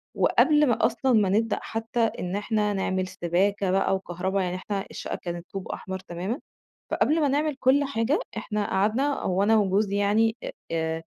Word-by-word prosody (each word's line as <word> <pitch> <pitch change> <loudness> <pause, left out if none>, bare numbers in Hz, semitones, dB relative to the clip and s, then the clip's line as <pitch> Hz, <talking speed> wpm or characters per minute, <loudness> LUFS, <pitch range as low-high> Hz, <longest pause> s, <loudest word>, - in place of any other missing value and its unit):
وقبْل 300 -1 +4
ما 240 - +2
أصلًا 250 +2 +1
ما 205 -4 +4
نبدأ 225 +3 +1
حتى 225 +2 -4
إن 195 -5 0
إحنا 210 0 0
نعمل 190 -1 -1
سِباكة 190 +3 0
بقى 195 0 +2
وكهربا 190 +1 -2
يعني 180 0 -2
إحنا 195 +1 -4
الشقة - - -5
كانت 175 -1 -5
طوب 195 -1 -5
أحمر 190 0 -5
تماما، 185 - -4 0.5
فقبْل 320 +2 +2
ما 290 - +3
نعمل 295 +1 0
كُلّ 270 +3 +4
حاجة 275 +2 0 0.2
إحنا 210 -2 -2
قعدنا 225 +9 +1
هو 185 +1 +1
أنا 220 +2 +4
وجوزي 200 0 +1
يعني 215 +3 +2
آآ، - - -5 0.2
آآ 160 0 -1
205 Hz, 170 wpm, -26 LUFS, 190-230 Hz, 0.5 s, وقبْل